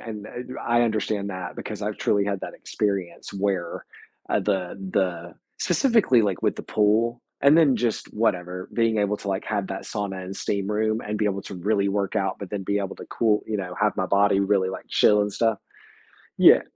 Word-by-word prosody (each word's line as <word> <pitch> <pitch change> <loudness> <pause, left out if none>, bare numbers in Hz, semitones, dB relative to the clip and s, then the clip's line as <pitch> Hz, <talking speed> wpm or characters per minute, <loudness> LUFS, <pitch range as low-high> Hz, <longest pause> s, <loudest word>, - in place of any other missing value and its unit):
and, 110 -2 -7
uh, - - -10 0.2
you 130 - -7
I 120 0 +2
understand 110 -3 -1
that 90 -1 -6
because 105 -1 -6
I've 105 0 -2
truly 100 -1 +1
had 100 -1 -2
that - - -6
experience 100 -3 -3
where, 95 -3 -2 0.4
uh, - - +2
the 95 -4 -1 0.2
the 85 -3 -1 0.2
Specifically, 225 - +3
like, 100 -4 -1
with - - +2
the - - -7
pool 115 +3 +1 0.2
and 140 +3 +6
then 150 -6 +5
just 120 -3 -2
whatever, 90 -4 -1
being 115 -2 +2
able 105 0 +1
to, 100 - -7
like, 95 0 -1
have 100 -3 -1
that 95 - -5
sauna 100 -3 -4
and 95 +1 -7
steam 100 -1 -2
room, 110 +1 +1
and 105 -1 -4
be 105 - 0
able 100 -1 0
to 100 - -8
really 100 +2 +1
work 100 -1 -1
out 95 - 0
but 100 - -7
then 100 -2 -3
be 100 +2 0
able 100 -1 -3
to - - -10
cool 110 -2 +1
you 110 - -1
know, 90 -2 -4
have 105 0 +2
my 95 - 0
body 100 0 +3
really, 100 -1 +2
like, 95 - -6
chill 105 0 +4
and 105 -1 -2
stuff. 110 0 +1 0.8
Yeah. - - +7
100 Hz, 210 wpm, -25 LUFS, 95-110 Hz, 0.8 s, Yeah